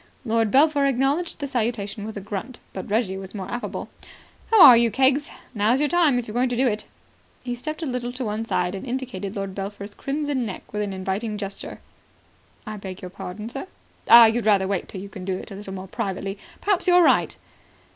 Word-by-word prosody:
Lord 225 Hz, -1 st, +2 dB
Belpher 285 Hz, +2 st, +4 dB
acknowledged 275 Hz, +6 st, 0 dB
the 285 Hz, -, -4 dB
salutation 220 Hz, -6 st, -2 dB
with 220 Hz, -1 st, -6 dB
a -, -, -5 dB
grunt, 205 Hz, +5 st, -6 dB, 0.2 s
but 190 Hz, -, -6 dB
Reggie 205 Hz, -3 st, 0 dB
was 190 Hz, +2 st, -9 dB
more 190 Hz, -2 st, -5 dB
affable. 240 Hz, 0 st, -4 dB, 0.6 s
"How 450 Hz, -, +5 dB
are 250 Hz, -, +11 dB
you, 235 Hz, 0 st, +4 dB
Keggs? 270 Hz, +5 st, +2 dB, 0.2 s
Now's 220 Hz, +4 st, +2 dB
your 295 Hz, 0 st, +1 dB
time, 320 Hz, -5 st, +3 dB
if 245 Hz, -, -3 dB
you're 210 Hz, -, -7 dB
going 245 Hz, +2 st, +1 dB
to 245 Hz, -, -2 dB
do 265 Hz, -, +3 dB
it." 210 Hz, -2 st, -1 dB, 0.6 s
He 245 Hz, -1 st, -3 dB
stepped 310 Hz, +7 st, -5 dB
a -, -, -1 dB
little 250 Hz, -3 st, -3 dB
to 255 Hz, 0 st, -3 dB
one 215 Hz, +1 st, -2 dB
side 180 Hz, -5 st, -1 dB
and 195 Hz, -, -6 dB
indicated 240 Hz, -6 st, -4 dB
Lord 195 Hz, -1 st, -4 dB
Belpher's 200 Hz, +1 st, -6 dB
crimson 285 Hz, 0 st, -2 dB
neck 205 Hz, -2 st, -7 dB
with 210 Hz, -, -1 dB
an 205 Hz, -1 st, -2 dB
inviting 195 Hz, +3 st, -3 dB
gesture. 200 Hz, -1 st, -7 dB, 0.8 s
"I 215 Hz, -1 st, -6 dB
beg 190 Hz, -1 st, -8 dB
your 180 Hz, -, -7 dB
pardon, 190 Hz, +4 st, -7 dB
sir?" 275 Hz, +8 st, -6 dB, 0.4 s
"Ah. 235 Hz, 0 st, +11 dB
You'd 225 Hz, 0 st, +1 dB
rather 195 Hz, -3 st, +4 dB
wait 195 Hz, -2 st, -2 dB
till 190 Hz, -, -7 dB
you 200 Hz, -, -7 dB
can 195 Hz, -2 st, -9 dB
do 185 Hz, 0 st, -2 dB
it -, -, -9 dB
a -, -, -6 dB
little 195 Hz, -1 st, -8 dB
more 190 Hz, 0 st, -7 dB
privately. 195 Hz, -1 st, -4 dB, 0.2 s
Perhaps 395 Hz, -2 st, +1 dB
you're 355 Hz, 0 st, +6 dB
right." -, -, +3 dB
220 Hz, 215 wpm, -24 LUFS, 195-260 Hz, 0.8 s, are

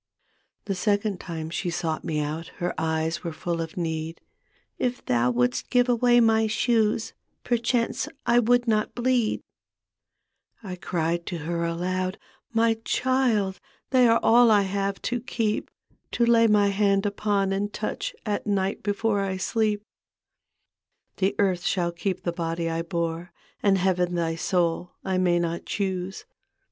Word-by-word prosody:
The 200 Hz, -, -1 dB
second 205 Hz, 0 st, 0 dB
time 160 Hz, -2 st, -6 dB
she 175 Hz, -, -2 dB
sought 170 Hz, -2 st, -2 dB
me 150 Hz, -2 st, -1 dB
out 155 Hz, +3 st, -4 dB
Her 175 Hz, 0 st, -2 dB
eyes 160 Hz, +1 st, -1 dB
were 170 Hz, -, -3 dB
full 170 Hz, +1 st, -3 dB
of 160 Hz, +1 st, -6 dB
need. 160 Hz, -1 st, -3 dB, 0.3 s
" -, -, -41 dB, 0.3 s
If 250 Hz, 0 st, -2 dB
thou 120 Hz, 0 st, +2 dB
wouldst 125 Hz, +1 st, 0 dB
give 245 Hz, -1 st, +3 dB
away 245 Hz, 0 st, +4 dB
my 225 Hz, -1 st, +4 dB
shoes 220 Hz, 0 st, +1 dB, 0.3 s
Perchance 240 Hz, +2 st, 0 dB, 0.2 s
I 240 Hz, 0 st, +4 dB
would 245 Hz, +1 st, +3 dB
not 215 Hz, -1 st, +1 dB
bleed." 245 Hz, -2 st, +1 dB, 1.2 s
I 185 Hz, -3 st, -5 dB
cried 170 Hz, -1 st, -2 dB
to 175 Hz, -, -3 dB
her 170 Hz, 0 st, -1 dB
aloud, 185 Hz, +2 st, -2 dB, 0.2 s
" -, -, -45 dB
My 225 Hz, -1 st, +3 dB
child. 240 Hz, -8 st, +1 dB, 0.3 s
They 255 Hz, -2 st, +5 dB
are 230 Hz, 0 st, +4 dB
all 240 Hz, +1 st, +6 dB
I 205 Hz, -2 st, +5 dB
have 195 Hz, 0 st, -2 dB
to 245 Hz, +1 st, -1 dB
keep, 225 Hz, -3 st, -1 dB, 0.4 s
To 235 Hz, -, +3 dB
lay 230 Hz, -1 st, +5 dB
my 205 Hz, -2 st, +4 dB
hand 200 Hz, 0 st, +2 dB
upon 200 Hz, -1 st, 0 dB
and 205 Hz, +1 st, -1 dB
toudi 210 Hz, -, -3 dB
At 210 Hz, -1 st, -2 dB
night 195 Hz, -1 st, 0 dB
before 205 Hz, +1 st, 0 dB
I 190 Hz, -1 st, -2 dB
sleep. 210 Hz, +1 st, 0 dB, 0.7 s
" -, -, -54 dB
The 195 Hz, +1 st, +1 dB
earth 190 Hz, -3 st, +2 dB
shall 175 Hz, -3 st, 0 dB
keep 185 Hz, +2 st, -3 dB
the 175 Hz, -, -1 dB
body 165 Hz, -1 st, -2 dB
I 165 Hz, 0 st, -1 dB
bore, 170 Hz, 0 st, -3 dB, 0.3 s
And 195 Hz, -1 st, +4 dB
Heaven 180 Hz, -1 st, +1 dB
thy 165 Hz, -1 st, 0 dB
soul. 170 Hz, +1 st, 0 dB
I 190 Hz, -1 st, 0 dB
may 175 Hz, -1 st, +3 dB
not 170 Hz, 0 st, -1 dB
dioose. 190 Hz, -2 st, -3 dB
195 Hz, 155 wpm, -25 LUFS, 170-220 Hz, 1.2 s, all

